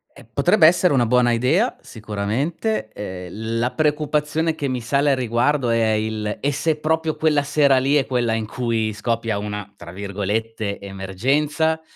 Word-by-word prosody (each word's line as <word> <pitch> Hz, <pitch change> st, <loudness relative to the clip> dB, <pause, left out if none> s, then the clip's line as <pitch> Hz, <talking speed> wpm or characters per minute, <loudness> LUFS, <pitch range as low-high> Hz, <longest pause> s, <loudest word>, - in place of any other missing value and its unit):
Eh, -, -, -14 dB
potrebbe 170 Hz, -7 st, +5 dB
essere 180 Hz, 0 st, +3 dB
una 125 Hz, -3 st, +3 dB
buona 125 Hz, 0 st, +3 dB
idea 140 Hz, -, +2 dB
sicuramente, 110 Hz, -, -3 dB
ehm, 105 Hz, +3 st, -5 dB
la 120 Hz, +2 st, 0 dB
preoccupazione 150 Hz, +1 st, 0 dB
che 145 Hz, -2 st, -3 dB
mi 130 Hz, -1 st, -2 dB
sale 140 Hz, +5 st, +2 dB
a -, -, +3 dB
riguardo 125 Hz, +2 st, +1 dB
è 115 Hz, -1 st, +2 dB
il: 110 Hz, -1 st, -2 dB
e 145 Hz, -, 0 dB
se 150 Hz, +2 st, -1 dB
proprio 160 Hz, 0 st, 0 dB
quella 155 Hz, -2 st, +2 dB
sera 140 Hz, -1 st, +3 dB
lì 135 Hz, +3 st, +1 dB
è 140 Hz, -3 st, +3 dB
quella 120 Hz, -3 st, 0 dB
in 110 Hz, -1 st, -1 dB
cui 115 Hz, -1 st, -1 dB
scoppia 115 Hz, 0 st, -2 dB
una, 105 Hz, 0 st, -5 dB
tra 85 Hz, -3 st, -11 dB
virgolette, 100 Hz, +2 st, -3 dB
"emergenza"? 135 Hz, -, -1 dB
120 Hz, 160 wpm, -21 LUFS, 110-150 Hz, -, potrebbe